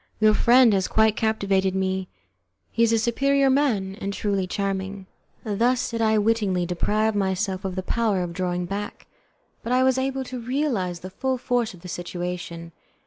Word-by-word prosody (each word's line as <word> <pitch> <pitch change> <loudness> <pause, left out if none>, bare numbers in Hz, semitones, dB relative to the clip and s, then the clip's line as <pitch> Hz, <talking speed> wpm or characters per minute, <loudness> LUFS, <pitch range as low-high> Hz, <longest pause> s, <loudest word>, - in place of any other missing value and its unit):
Your 215 0 +5
friend 240 0 +5
has 190 -1 +1
quite 220 -1 +3
captivated 195 -4 +1
me; 190 0 -1 0.6
he 230 - -1
is 230 -1 +4
a 230 - +3
superior 275 +4 +2
man, 230 -9 +1
and 200 - -2
truly 200 -2 -1
charming." 195 0 -3 0.4
Thus 235 +4 0
did 230 0 -2
I 220 -1 +3
wittingly 205 -4 +1
deprive 210 +5 0
myself 190 -1 -1
of 190 -2 -3
the 185 - -3
power 210 -4 0
of 170 -1 -5
drawing 180 -1 -2
back, 200 +3 -5 0.6
but 235 - -5
I 255 +1 +4
was 260 0 +3
able 265 0 -1
to 255 -1 -6
realize 230 - -1
the 185 - -8
full 260 +6 -1
force 245 -4 -1
of 170 - -17
the 180 - -9
situation. 175 -1 -5
205 Hz, 175 wpm, -24 LUFS, 190-235 Hz, 0.6 s, Your